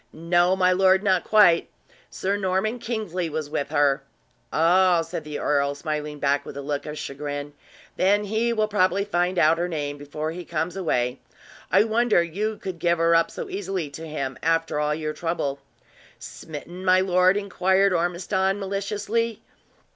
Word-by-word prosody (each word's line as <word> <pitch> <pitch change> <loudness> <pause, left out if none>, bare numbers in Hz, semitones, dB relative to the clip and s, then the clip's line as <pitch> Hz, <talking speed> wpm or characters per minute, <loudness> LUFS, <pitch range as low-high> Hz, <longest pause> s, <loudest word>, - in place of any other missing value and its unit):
"No, 175 +3 +2
my 185 -1 +3
lord, 190 +1 +4
not 190 -3 +2
quits; 205 -6 +5 0.4
Sir 195 +2 -2
Norman 205 +4 -1
Kingsley 215 -7 -3
was 155 -1 -4
with 145 - -2
her!" 140 -2 +2 0.5
"Oh!" 175 +1 +4
said 165 -1 -6
the 150 -1 -6
earl, 140 -1 0
smiling 150 0 -4
back 140 0 +1
with - - -9
a - - -4
look 145 +1 -3
of 150 0 -6
chagrin. 145 0 -5 0.4
"Then 200 +3 +3
he 220 +3 0
will 215 -2 +1
probably 200 -1 +1
find 180 -2 0
out 165 0 +4
her 175 - 0
name 145 -4 -4
before 150 +2 -4
he 175 +2 -7
comes 165 +1 -3
away. 125 -9 -1 0.5
I 195 +3 +6
wonder 225 -4 +2
you 205 +6 -3
could 185 -3 -6
give 170 +1 +2
her 165 0 +3
up 165 0 +3
so - - -6
easily 190 -6 -4
to 160 +3 -8
him, 135 -4 -4
after 165 -1 0
all 150 0 0
your 155 -1 -3
trouble!" 150 -4 -2 0.6
"Smitten, 170 +4 -9
my 185 0 +5
lord?" 185 +1 +3
inquired 195 -1 +2
Ormiston, 190 +3 0
maliciously. 205 +3 -2
175 Hz, 165 wpm, -24 LUFS, 155-195 Hz, 0.6 s, I